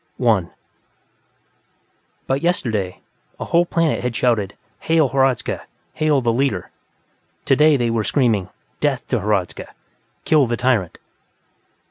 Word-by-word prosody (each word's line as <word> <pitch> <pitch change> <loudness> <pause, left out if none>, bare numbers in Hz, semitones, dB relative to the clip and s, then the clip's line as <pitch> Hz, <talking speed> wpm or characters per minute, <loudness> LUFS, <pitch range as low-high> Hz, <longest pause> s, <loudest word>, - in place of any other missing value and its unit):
_ - - -44
1 110 -8 +2 1.8
But 135 +1 -1
yesterday, 110 - -1 0.4
a - - -4
whole 170 +1 +2
planet 165 -3 +1
had 125 -2 -3
shouted: 115 -6 0 0.2
Hail 160 -4 +2
Hradzka! 135 -2 0 0.3
Hail 150 -3 +1
the 115 -2 +1
Leader! 125 -8 -1 0.7
Today, 150 +2 +4
they 120 -2 0
were 115 -1 0
screaming: 110 -8 +1 0.3
_Death 140 -4 0
to 125 - +1
Hradzka! 100 -3 -1 0.6
Kill 150 -5 +4
the 120 0 -1
tyrant! 125 -9 0
125 Hz, 120 wpm, -20 LUFS, 110-145 Hz, 1.8 s, Today